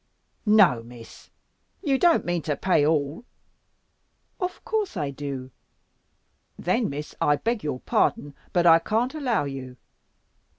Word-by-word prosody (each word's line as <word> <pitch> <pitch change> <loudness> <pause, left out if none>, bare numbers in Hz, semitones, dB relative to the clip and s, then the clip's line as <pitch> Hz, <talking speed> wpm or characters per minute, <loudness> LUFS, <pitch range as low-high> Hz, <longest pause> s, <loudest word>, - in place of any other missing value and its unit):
"No, 195 - +5
Miss! 115 0 -13 0.5
You 275 -5 +1
don't 345 -2 +4
mean 175 -1 -1
to 150 -1 -2
pay 180 -6 +2
all!" 150 - 0 1.2
"Of 365 -1 -4
course, 425 - -2
I 145 -4 -2
do." 135 -2 -6 1.1
"Then, 220 +6 0
Miss, 150 +2 -6
I 145 - +4
beg 230 +6 -2
your 145 -4 -3
pardon, 145 -1 0 0.2
but 175 -1 +2
I 165 -1 +8
can't 225 - -1
allow 265 - 0
you. 135 -2 -7
165 Hz, 130 wpm, -25 LUFS, 140-230 Hz, 1.2 s, I